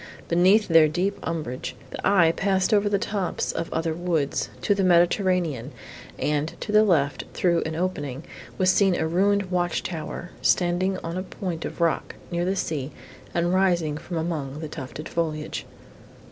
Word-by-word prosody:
Beneath 185 Hz, +5 st, +4 dB
their 165 Hz, -2 st, +6 dB
deep 180 Hz, +6 st, -1 dB
umbrage, 130 Hz, -6 st, -4 dB, 0.2 s
the -, -, -6 dB
eye 175 Hz, -5 st, +5 dB
passed 190 Hz, +2 st, +1 dB
over 205 Hz, 0 st, +3 dB
the 200 Hz, -, +2 dB
tops 200 Hz, -3 st, -2 dB
of 165 Hz, -, -4 dB
other 160 Hz, 0 st, -1 dB
woods, 165 Hz, -4 st, -1 dB
to 205 Hz, -, +3 dB
the 200 Hz, -1 st, 0 dB
Mediterranean, 175 Hz, -, +2 dB, 0.5 s
and, 150 Hz, +1 st, -1 dB
to -, -, -4 dB
the 215 Hz, 0 st, +6 dB
left, 150 Hz, -9 st, +1 dB
through 170 Hz, -2 st, +2 dB
an 160 Hz, -, -4 dB
opening, 145 Hz, -6 st, -3 dB, 0.3 s
was 185 Hz, 0 st, +4 dB
seen 195 Hz, -2 st, +3 dB
a 160 Hz, -, 0 dB
ruined 195 Hz, +3 st, +1 dB
watch 175 Hz, -1 st, 0 dB
tower, 170 Hz, +1 st, -5 dB
standing 185 Hz, +2 st, +2 dB
on 165 Hz, +2 st, -4 dB
a -, -, -1 dB
point 180 Hz, -3 st, -5 dB
of -, -, -6 dB
rock, 165 Hz, -1 st, 0 dB, 0.2 s
near 175 Hz, 0 st, 0 dB
the 190 Hz, +2 st, 0 dB
sea, 150 Hz, -7 st, -2 dB, 0.5 s
and 175 Hz, +1 st, +1 dB
rising 175 Hz, -5 st, +2 dB
from 170 Hz, +3 st, -5 dB
among 155 Hz, -4 st, -3 dB
the 155 Hz, -, -5 dB
tufted 150 Hz, +1 st, -7 dB
foliage. 155 Hz, -2 st, -3 dB
175 Hz, 165 wpm, -25 LUFS, 160-185 Hz, 0.5 s, their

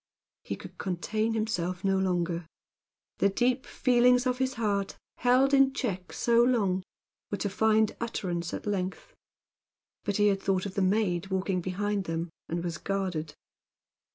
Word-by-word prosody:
He -, -, -4 dB
could -, -, -12 dB
contain 215 Hz, +5 st, -1 dB
himself 185 Hz, -5 st, -2 dB
no 195 Hz, -1 st, +2 dB
longer. 175 Hz, -3 st, -1 dB, 0.7 s
The 200 Hz, -, +4 dB
deep 250 Hz, +5 st, +1 dB
feelings 250 Hz, 0 st, +4 dB
of 250 Hz, 0 st, 0 dB
his 260 Hz, 0 st, 0 dB
heart, 205 Hz, -4 st, -1 dB, 0.2 s
held 260 Hz, +2 st, +4 dB
in 270 Hz, -1 st, +5 dB
check 195 Hz, -10 st, -3 dB
so 235 Hz, 0 st, +3 dB
long, 205 Hz, -7 st, +2 dB, 0.5 s
were 205 Hz, -, -2 dB
to 205 Hz, -, -1 dB
find 220 Hz, +1 st, +3 dB
utterance 175 Hz, -7 st, -2 dB
at -, -, -5 dB
length. 195 Hz, -2 st, -3 dB, 0.9 s
But 205 Hz, -, -1 dB
he 210 Hz, 0 st, +5 dB
had 195 Hz, -1 st, +1 dB
a -, -, -19 dB
thought 190 Hz, -1 st, 0 dB
of 195 Hz, -, -5 dB
the 200 Hz, -, 0 dB
maid 190 Hz, -2 st, +1 dB
walking 190 Hz, -1 st, -1 dB
behind 195 Hz, +2 st, -1 dB
them, 165 Hz, 0 st, -3 dB, 0.2 s
and 170 Hz, +1 st, -2 dB
was 170 Hz, -1 st, -3 dB
guarded. 180 Hz, -6 st, -2 dB
195 Hz, 155 wpm, -29 LUFS, 180-230 Hz, 0.9 s, in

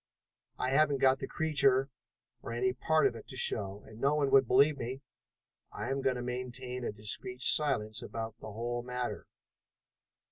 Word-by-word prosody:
"I 130 Hz, -, -1 dB
haven't 145 Hz, 0 st, +4 dB
got 135 Hz, 0 st, +4 dB
the -, -, -4 dB
creature 140 Hz, -4 st, +2 dB, 0.5 s
or -, -, -7 dB
any 125 Hz, +1 st, +1 dB
part 155 Hz, +5 st, +2 dB
of -, -, +2 dB
it 115 Hz, -, -10 dB
to 130 Hz, -, -7 dB
show, 100 Hz, -4 st, 0 dB
and 110 Hz, -, -13 dB
no 140 Hz, +2 st, +3 dB
one 145 Hz, -2 st, +1 dB
would 135 Hz, -2 st, +6 dB
believe 140 Hz, +4 st, +4 dB
me. 130 Hz, +4 st, -5 dB, 0.7 s
I 105 Hz, +5 st, -4 dB
am 135 Hz, 0 st, -1 dB
going 130 Hz, -1 st, +1 dB
to 125 Hz, -, -4 dB
maintain 125 Hz, 0 st, -5 dB
a -, -, -2 dB
discreet 105 Hz, +4 st, -4 dB
silence 125 Hz, -7 st, +2 dB
about 115 Hz, 0 st, -6 dB
the 110 Hz, -, -8 dB
whole 120 Hz, +3 st, -3 dB
matter." 125 Hz, 0 st, -4 dB
125 Hz, 175 wpm, -32 LUFS, 115-135 Hz, 0.7 s, would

